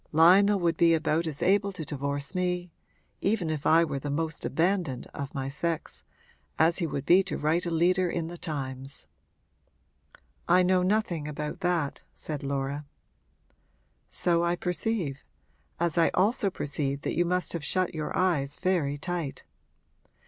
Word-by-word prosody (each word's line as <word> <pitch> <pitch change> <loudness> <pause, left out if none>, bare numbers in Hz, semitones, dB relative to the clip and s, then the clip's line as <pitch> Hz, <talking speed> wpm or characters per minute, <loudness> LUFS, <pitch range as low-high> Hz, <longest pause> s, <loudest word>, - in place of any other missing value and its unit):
Lionel 190 +6 +6
would 170 -2 +1
be 165 -1 +5
about 160 +1 0
as 150 -3 -3
able 200 +2 +3
to 165 -4 -6
divorce 140 0 -3
me 180 -1 -1 0.5
even 195 -5 0
if 155 -2 -2
I 165 +1 +6
were 145 -4 -2
the 145 - -5
most 160 +3 -2
abandoned 170 -7 0
of 140 -1 -6
my 135 -1 -2
sex 165 +3 -3 0.5
as 165 +2 +3
he 170 - 0
would 140 -2 -4
be 180 +4 +6
to 195 - -4
write 165 +4 +1
a - - 0
leader 175 +2 +2
in 170 -1 -2
the 170 +2 -7
Times.' 135 -5 -5 1.4
'I 180 +1 +6
know 185 0 +3
nothing 180 -5 0
about 150 0 -5
that,' 175 -5 -1
said 150 -3 -5
Laura. 140 +1 -3 1.2
'So 170 -1 +1
I 170 0 +1
perceive 180 -5 -2 0.6
as 170 -1 +1
I 165 - +5
also 200 +2 +2
perceive 140 -4 -2
that - - -2
you 175 - +3
must 180 +1 -1
have 170 -3 -4
shut 185 +2 0
your 155 -2 -3
eyes 150 -7 +1
very 170 -7 0
tight. 170 -2 -4
165 Hz, 155 wpm, -28 LUFS, 145-180 Hz, 1.4 s, Lionel